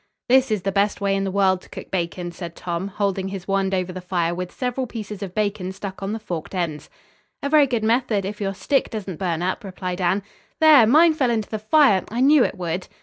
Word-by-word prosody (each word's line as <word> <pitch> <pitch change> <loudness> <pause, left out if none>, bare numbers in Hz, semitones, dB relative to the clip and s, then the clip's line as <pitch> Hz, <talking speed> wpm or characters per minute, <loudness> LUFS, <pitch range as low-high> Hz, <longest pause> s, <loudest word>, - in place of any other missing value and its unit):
"This 260 +1 +4
is 210 -4 -1
the 195 - 0
best 200 +1 +1
way 200 -1 +1
in 195 0 -1
the - - -1
world 190 -1 +2
to - - -18
cook - - -9
bacon," 175 -1 -3
said 170 -1 -8
Tom, 175 +1 -3
holding 200 -1 -2
his 190 -1 -7
wand 195 -1 +1
over 185 0 -2
the 185 - -6
fire 175 -2 -1
with 180 0 -5
several 250 0 -3
pieces 210 -3 -7
of 190 -2 -6
bacon 205 -3 -1
stuck 195 0 -7
on 195 +1 -3
the 220 - -2
forked 190 -5 -6
ends. 155 -4 -3 0.5
"A 280 - 0
very 295 -1 +5
good 240 -4 -1
method, 225 -3 +1
if 210 +2 -6
your 195 -1 -2
stick 275 +7 0
doesn't 195 -7 -6
burn 175 -3 -1
up," 185 +5 -2
replied 185 -1 -5
Anne. 185 +3 +1 0.4
"There! 300 -8 +7
Mine 315 +7 +6
fell 270 -5 +1
into 220 -3 -1
the 215 - -2
fire. 215 -3 +4
I 230 - -3
knew 280 +1 +6
it - - -2
would." 175 0 -3
195 Hz, 235 wpm, -22 LUFS, 185-225 Hz, 0.5 s, There